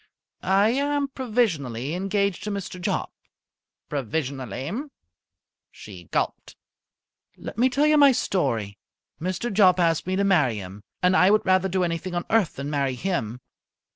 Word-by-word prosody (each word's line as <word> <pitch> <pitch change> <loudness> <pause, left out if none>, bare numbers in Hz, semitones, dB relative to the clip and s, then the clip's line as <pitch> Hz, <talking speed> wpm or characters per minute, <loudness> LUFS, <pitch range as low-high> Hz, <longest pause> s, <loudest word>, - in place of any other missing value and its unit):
"I 195 +3 +3
am 285 +2 0
provisionally 165 - -1
engaged 195 +1 -1
to - - -2
Mr. 195 -3 -5
Jopp." - - -2 0.8
"Provisionally?" 135 -1 -3 1.0
She 90 -5 -12
gulped. - - -3 0.8
"Let - - -8
me 255 +2 +4
tell 280 +4 +2
you 305 0 +4
my 285 -1 +8
story. 115 - -1 0.4
Mr. 185 +6 -2
Jopp 185 -3 +5
asked 165 -1 +1
me 185 - 0
to 200 - +1
marry 160 - +3
him, 100 +1 -9 0.2
and 180 +1 +4
I 185 - +5
would 215 +1 +3
rather 185 0 +3
do 185 0 0
anything 170 +1 -3
on 175 - -2
earth 215 -6 +2
than 140 +2 -5
marry 140 -3 0
him. 125 - -3
180 Hz, 145 wpm, -24 LUFS, 140-205 Hz, 1.0 s, my